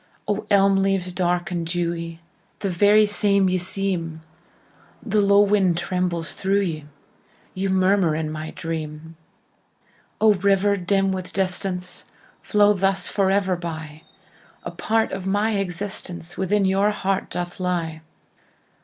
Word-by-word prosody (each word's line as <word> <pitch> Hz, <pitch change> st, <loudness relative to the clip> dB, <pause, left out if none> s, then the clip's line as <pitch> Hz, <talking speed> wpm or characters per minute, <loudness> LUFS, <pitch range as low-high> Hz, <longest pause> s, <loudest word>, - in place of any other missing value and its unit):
O, 210 Hz, +1 st, -2 dB
elm 195 Hz, -1 st, +4 dB
leaves 195 Hz, -2 st, 0 dB
dark 175 Hz, 0 st, -1 dB
and 175 Hz, -1 st, -2 dB
dewy, 170 Hz, -1 st, -3 dB, 0.4 s
The 195 Hz, -, -1 dB
very 205 Hz, +4 st, +5 dB
same 200 Hz, -2 st, +2 dB
ye 185 Hz, 0 st, +1 dB
seem, 180 Hz, -3 st, -2 dB, 0.8 s
The 215 Hz, -2 st, +2 dB
low 200 Hz, 0 st, +5 dB
wind 195 Hz, -4 st, +3 dB
trembles 175 Hz, -1 st, -2 dB
through 195 Hz, +1 st, +1 dB
ye, 160 Hz, -6 st, -3 dB, 0.7 s
Ye 190 Hz, +1 st, -2 dB
murmur 190 Hz, -3 st, +2 dB
in 155 Hz, -1 st, -2 dB
my 155 Hz, 0 st, -5 dB
dream!O, 160 Hz, +6 st, -4 dB
river, 200 Hz, +1 st, +2 dB
dim 195 Hz, +1 st, +1 dB
with 185 Hz, -1 st, -4 dB
distance, 185 Hz, -1 st, -2 dB, 0.4 s
Flow 210 Hz, -1 st, +4 dB
thus 195 Hz, 0 st, 0 dB
forever 195 Hz, -1 st, +1 dB
by,A 160 Hz, -3 st, -10 dB
part 225 Hz, 0 st, 0 dB
of 190 Hz, -1 st, -5 dB
my 205 Hz, +3 st, +1 dB
existenceWithin 190 Hz, 0 st, -2 dB
your 195 Hz, +2 st, +2 dB
heart 195 Hz, -2 st, -2 dB
doth 175 Hz, 0 st, -5 dB
lie! 170 Hz, -3 st, -2 dB
190 Hz, 120 wpm, -23 LUFS, 170-200 Hz, 0.8 s, very